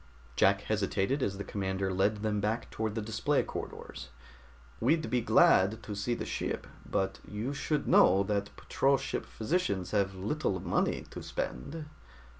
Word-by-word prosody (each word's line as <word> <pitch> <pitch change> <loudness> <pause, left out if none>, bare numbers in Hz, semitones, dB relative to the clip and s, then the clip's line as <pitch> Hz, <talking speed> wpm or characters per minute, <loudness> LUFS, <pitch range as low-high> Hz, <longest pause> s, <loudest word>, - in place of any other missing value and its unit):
Jack 100 +6 +4
hesitated 105 +5 0
as 100 -5 -1
the 100 - -4
commander 95 -1 -2
led 100 +3 +1
them 105 -1 0
back 110 +3 -1
toward 110 -1 -2
the 110 - -2
display 110 +7 +1
corridors. 65 -2 -7 0.7
"We'd 155 +6 +2
be 125 -1 +2
glad 110 0 +4
to 105 - -5
see 105 +4 -1
the - - -4
ship, - - -3 0.2
but 95 0 -1
you 110 +7 -3
should 145 +2 -1
know 100 +1 +6
that 100 0 -1
patrol 135 0 +2
ship - - -4
physicians 110 - -1
have 100 -2 +1
little 100 +1 -1
money - - 0
to - - -7
spend." 150 - -4
105 Hz, 155 wpm, -31 LUFS, 95-120 Hz, 0.7 s, know